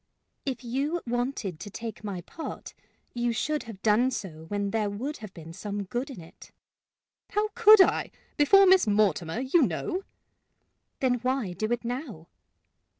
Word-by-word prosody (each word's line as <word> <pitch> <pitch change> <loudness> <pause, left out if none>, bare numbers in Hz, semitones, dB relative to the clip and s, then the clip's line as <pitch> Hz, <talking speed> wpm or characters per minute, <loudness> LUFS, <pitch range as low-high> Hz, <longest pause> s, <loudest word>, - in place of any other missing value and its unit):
"If 255 -2 -3
you 280 +8 -1
wanted 240 - -2
to 205 - -7
take 225 +1 -7
my 195 -4 -4
part, 320 - -8 0.4
you 240 0 0
should 300 +5 -1
have 195 -3 -10
done 225 +4 +4
so 170 -10 -6
when 200 0 -2
there 215 -1 0
would 255 +9 -4
have 215 -3 -9
been 165 -1 -10
some 205 +2 -4
good 240 +8 -3
in 260 - -8
it." 165 -1 -14 0.8
"How 425 +1 0
could 435 -3 +8
I, - - +3 0.3
before 390 +7 +6
Miss 375 -8 +6
Mortimer, 205 -3 +1
you 270 +6 +3
know!" 255 - -1 1.0
"Then 250 -2 +2
why 250 -6 -1
do 215 +6 -3
it 240 0 -1
now?" 245 - -5
235 Hz, 155 wpm, -27 LUFS, 200-275 Hz, 1.0 s, could